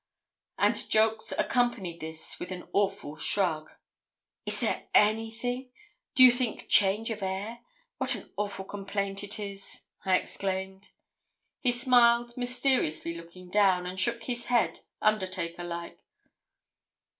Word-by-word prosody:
And - - +1
Jolks 220 0 +2
accompanied 240 -9 0
this 160 0 -8
with 180 - -6
an 180 -1 -7
awful 195 -7 0
shrug. 155 -3 +2 0.8
'Is - - -1
there - - -1
anything? 225 +4 +1 0.4
Do 255 - +8
you 255 - +10
think 245 -2 -2
change 210 +3 +4
of 215 -1 -5
air? 195 +5 -3 0.4
What - - +1
an - - -11
awful 200 -2 -3
complaint 200 0 -3
it 205 +1 -3
is,' 200 -1 -5 0.2
I 190 -1 +3
exclaimed. 190 0 -4 0.7
He 250 - +2
smiled, 240 -1 +4
mysteriously 245 - 0
looking 170 +2 -11
down, 190 -3 +3
and 185 +1 -5
shook 230 +4 +3
his 240 -1 -3
head 245 -1 +1 0.2
undertaker 185 -5 0
like. 170 0 -6
205 Hz, 125 wpm, -29 LUFS, 185-235 Hz, 0.8 s, you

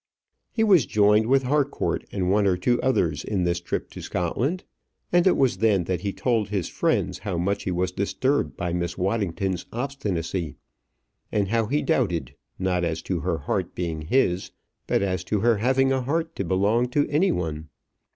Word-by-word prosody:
He 225 - +1
was 190 - +5
joined 105 +1 +4
with 135 +1 +3
Harcourt 140 +2 0
and 95 -2 0
one 100 0 +3
or 90 -2 +2
two 120 +7 +1
others 85 -12 +1
in 100 -4 -1
this 85 0 0
trip - - -4
to - - -8
Scotland, 125 - -2 0.5
and 175 +1 +4
it 185 - +4
was 130 -3 +2
then 105 -5 +3
that 90 0 -2
he 100 - -2
told 115 -2 0
his 100 -5 -1
friend - - 0
how 95 -4 -3
much 100 +4 -1
he 95 - -1
was 90 +1 0
disturbed 130 +9 0
by 85 -1 -2
Miss 85 0 -2
Waddington's 95 -2 -1
obstinacy; 95 - -3 0.8
and 100 -3 0
how 115 0 +1
he 145 +6 0
doubted, 115 - 0 0.2
not 90 -1 0
as 85 -1 -2
to - - -2
her - - -1
heart - - -3
being 85 -3 -3
his, 90 - +1 0.4
but - - +1
as 95 -3 -1
to 105 0 0
her 115 0 +3
having 130 +4 +2
a 130 -1 +1
heart 160 +6 -2
to - - -1
belong 100 +7 +2
to 145 +3 +1
any 160 +7 +2
one. 80 -2 -3
100 Hz, 185 wpm, -25 LUFS, 90-130 Hz, 0.8 s, was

